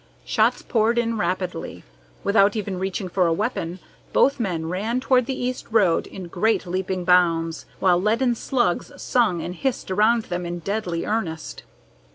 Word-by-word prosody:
Shots - - +2
poured 230 +1 +1
in 230 -2 0
rapidly. 180 - -3 0.4
Without 200 0 +4
even 200 -3 -3
reaching 190 0 -3
for 180 0 +1
a 165 - +2
weapon, 180 -3 -2 0.4
both 275 0 +3
men 175 -7 -2
ran 210 +8 -1
toward 255 -2 +2
the 265 - -3
east 250 0 -3
road 205 -7 +3
in 185 -2 -8
great 215 +6 +1
leaping 185 0 -2
bounds, 165 -2 +2
while 180 -2 +3
leaden 230 +5 +2
slugs 235 -5 -1
sung 215 -9 +1
and 175 - -4
hissed 245 +1 -3
around 220 +4 +3
them 180 -2 -4
in 175 0 -4
deadly 180 -1 -3
earnest. 175 -8 -3
190 Hz, 160 wpm, -23 LUFS, 175-230 Hz, 0.4 s, Without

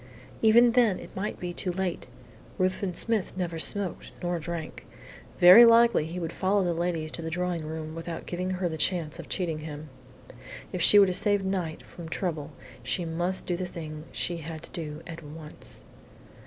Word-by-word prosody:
Even 235 +2 +6
then 230 -6 +3
it - - -11
might 200 +3 -3
be 175 -1 -4
too 180 - -2
late. 185 -1 -3 0.5
Ruthven 185 0 -1
Smith 225 -2 0
neither 170 -3 -3
smoked 185 +4 -1
nor 175 -1 -1
drank. 165 0 -6 0.5
Very 180 +7 +10
likely 230 -7 +5
he 175 +2 -5
would 165 -1 -4
follow 195 +1 +1
the 175 -1 0
ladies 165 -2 -2
to 170 - -4
the 160 - -4
drawing 175 0 -2
room 155 0 -6
without 165 0 -6
giving 180 +1 -3
her 185 -1 -1
the 160 -2 -5
chance 165 -4 0
of - - -9
cheating 165 -4 -2
him. 155 0 -8 0.8
If 180 - -2
she 205 - +8
were 200 - +9
to 185 - -1
save 205 0 +1
Knight 180 -5 -3
from 170 -2 -10
trouble 160 -4 -3 0.3
she 125 +8 -2
must 175 +3 -2
do 175 - -1
the 180 +1 -3
thing 155 -3 -8
she 175 - -1
had 160 0 -7
to - - -9
do 155 -3 -6
at 165 -1 -8
once. 150 0 -6
175 Hz, 185 wpm, -27 LUFS, 160-185 Hz, 0.8 s, Very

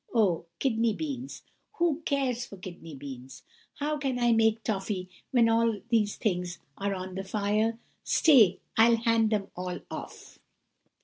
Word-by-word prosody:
Oh, 185 -7 +2
kidney 230 -3 +1
beans! 275 -3 -5 0.3
Who 335 -2 +1
cares 260 -4 0
for 200 - -11
kidney 175 -4 -9
beans? 130 -2 -9 0.3
How 300 +1 -2
can 270 -3 -1
I 240 -1 +3
make 225 -1 +3
toffey, 195 -3 -2 0.2
when 240 -4 +4
all 230 -1 +2
these 215 -3 +2
things 180 -4 -2 0.2
are 200 0 -2
on 185 0 -6
the 190 +1 -4
fire? 210 +3 0 0.3
Stay, 240 - +5
I'll 230 +1 +6
hand 230 -1 +2
them 210 -2 -1
all 180 0 -4
off! - - -9
220 Hz, 145 wpm, -28 LUFS, 190-240 Hz, 0.3 s, I'll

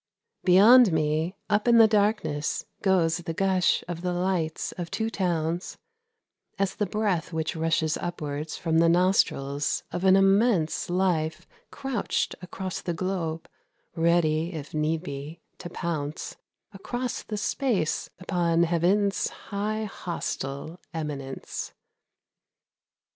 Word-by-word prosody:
Beyond 210 +5 +7
me, 160 +3 0
up 210 0 +1
the 230 -2 +7
darkness, 205 -8 0 0.2
goes 175 -4 +3
the 170 -2 -5
gush 190 -1 +2
of 170 -1 -5
the 180 0 -1
lights 175 -3 -1
of 175 -2 -6
two 225 +4 -2
towns, 170 -3 -1 0.8
As 195 -1 0
the 210 - -1
breath 190 -5 -1
which 160 0 -2
rushes 160 -1 +1
upwards 150 -3 -4
from 160 -1 +1
the 165 0 +5
nostrils 150 -6 +1
of 180 - -3
an 190 0 +6
immense 195 -4 +3
Life 175 -4 0 0.2
crouched 270 -6 -2
across 185 +1 -5
the 175 - -3
globe, 165 -3 -3 0.5
ready, 165 0 +2
if 155 -3 -7
need 155 +2 0
be, 145 +1 -7 0.2
to 175 - -7
pounce 155 -4 -4 0.4
Across 245 +5 -4
the 210 - -4
space 205 - 0
upon 170 -2 +1
heaven's 180 +4 +2
high 215 +2 -3
hostile 165 -5 -5 0.2
eminence. 140 -4 -5
175 Hz, 115 wpm, -26 LUFS, 160-195 Hz, 0.8 s, Beyond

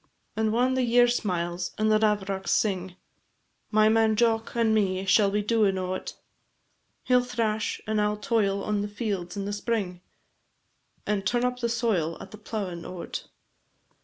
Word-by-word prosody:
And 220 0 +1
whan 250 +3 +2
the 260 - +1
year 245 0 +5
smiles, 175 -6 -2
and 215 0 +2
the 215 - +4
lavrocks 200 -3 0
sing, 190 -3 0 0.7
My 215 0 +4
man 220 0 +3
Jock 225 0 +1
and 230 -2 +2
me 190 -3 +1
shall 200 +1 +4
be 205 +1 0
doin' 210 -3 +2
o't; 185 0 -4 0.9
He 250 - +2
'll 250 - +6
thrash, 225 -3 -1
and 215 -1 0
I 210 - +3
'll 210 0 -2
toil 205 -2 0
on 210 -1 -1
the 205 - -2
fields 205 -4 -4
in 200 - -3
the 205 - -3
spring, 205 -4 -2 1.0
And 210 -2 -1
turn 240 +5 +1
up 250 0 -1
the 235 -1 -1
soil 215 -9 0
at - - -10
the 215 - -11
plowin' 195 -6 -5
o't. 180 -2 -6
210 Hz, 170 wpm, -26 LUFS, 195-225 Hz, 1.0 s, ll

